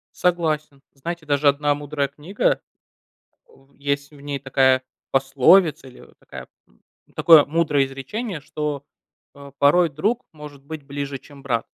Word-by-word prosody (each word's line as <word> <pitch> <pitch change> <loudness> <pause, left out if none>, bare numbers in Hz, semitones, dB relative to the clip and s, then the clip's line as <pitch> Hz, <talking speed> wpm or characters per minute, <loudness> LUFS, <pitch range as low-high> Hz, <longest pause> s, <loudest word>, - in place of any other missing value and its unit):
Согласен. 155 -5 -1
Знаете, 165 +4 -6
даже 145 0 +1
1 145 +1 +3
мудрая 145 -1 -2
книга, 175 - -1 0.9
э, - - -22
в 135 +1 -24
есть 140 0 -3
в 145 - -16
ней 140 -1 -4
такая 130 -1 +2 0.3
пословица- 135 +4 +4
или 125 - -14
вот - - -19
такая - - -11 0.2
м, - - -30 0.4
такое 160 -4 +7
мудрое 150 -3 +1
изречение, 160 - -5
что, 145 0 -4 0.5
э, 140 0 -12
"порой 170 +4 +5
друг 210 - -1
может 150 -2 -12
быть 155 +1 -8
ближе, 140 0 -5
чем 140 0 -16
брат". 120 -5 -1
145 Hz, 145 wpm, -22 LUFS, 140-155 Hz, 0.9 s, такое